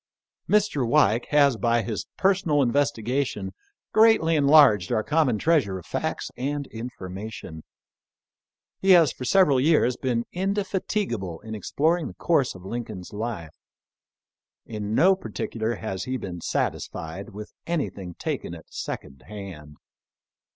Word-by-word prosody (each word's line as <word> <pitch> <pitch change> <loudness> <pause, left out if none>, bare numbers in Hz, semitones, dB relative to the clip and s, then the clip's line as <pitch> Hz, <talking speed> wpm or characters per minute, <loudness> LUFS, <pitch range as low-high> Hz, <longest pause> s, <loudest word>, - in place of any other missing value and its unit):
Mr. 210 -8 +2
Weik 120 -2 +3
has 140 -4 +4
by 115 +2 +1
his 110 -3 -4
personal 180 -7 +2
investigation 125 -5 -1 0.4
greatly 215 -7 +5
enlarged 140 - +5
our 110 - +1
common 150 -6 +2
treasure 125 - +2
of 90 - -10
facts - - -3
and 140 +2 -3
informa 110 -3 -7
tion. 80 -7 -9 1.2
He 195 - -1
has 160 -6 +4
for 125 - -7
several 150 -4 +4
years 130 -4 +3
been 120 -3 -1
indefatigable 190 - -2
in 110 - -8
exploring 155 - 0
the - - -10
course 145 - +1
of 95 0 -12
Lincoln's 105 -4 -6
life. 105 -7 -5 1.1
In 105 -1 -4
no 185 +8 +5
particular 115 - -3
has 95 -2 -5
he 130 0 -2
been 90 -6 -7
satisfied 80 +5 -3
with 105 +2 -9
anything 100 - -3
taken - - -4
at - - -15
second 65 -1 -6
hand. 85 -8 -9
120 Hz, 130 wpm, -25 LUFS, 105-150 Hz, 1.2 s, greatly